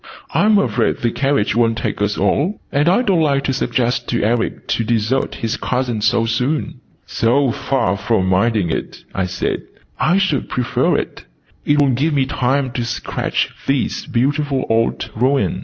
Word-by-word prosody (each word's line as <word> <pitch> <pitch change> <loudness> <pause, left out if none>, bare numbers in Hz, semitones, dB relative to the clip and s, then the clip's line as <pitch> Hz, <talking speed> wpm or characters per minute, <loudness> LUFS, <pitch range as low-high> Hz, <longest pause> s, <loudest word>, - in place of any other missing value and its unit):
"I'm 210 0 +4
afraid 200 - +1
the 120 - -1
carriage 135 -4 0
wont 115 -1 +2
take 115 - -3
us 105 0 0
all, 145 - +1
and 145 +3 +2
I 195 +8 +3
don't 190 -7 +2
like 140 -3 +2
to 135 - 0
suggest 120 -2 -1
to 120 - 0
Eric 115 +2 -1
to 115 - +1
desert 115 +3 0
his 115 +4 -2
cousin 125 -3 -1
so 115 +2 +2
soon." 125 +7 -1 0.3
"So 125 +3 +2
far 105 -7 0
from 105 -1 0
minding 95 -1 +2
it," - - -5
I 95 -1 -1
said, 95 +1 -2 0.4
"I 175 +4 +3
should 190 -8 0
prefer 125 -1 +1
it. - - -5 0.4
It 145 0 +3
will 140 -2 +4
give 145 +5 0
me 135 -2 +2
time 130 0 0
to 120 -1 -2
sketch 120 +1 -2 0.2
this 135 +2 -1
beautiful 140 +1 0
old 115 0 0
ruin." 130 +5 +1
125 Hz, 170 wpm, -18 LUFS, 115-140 Hz, 0.4 s, I'm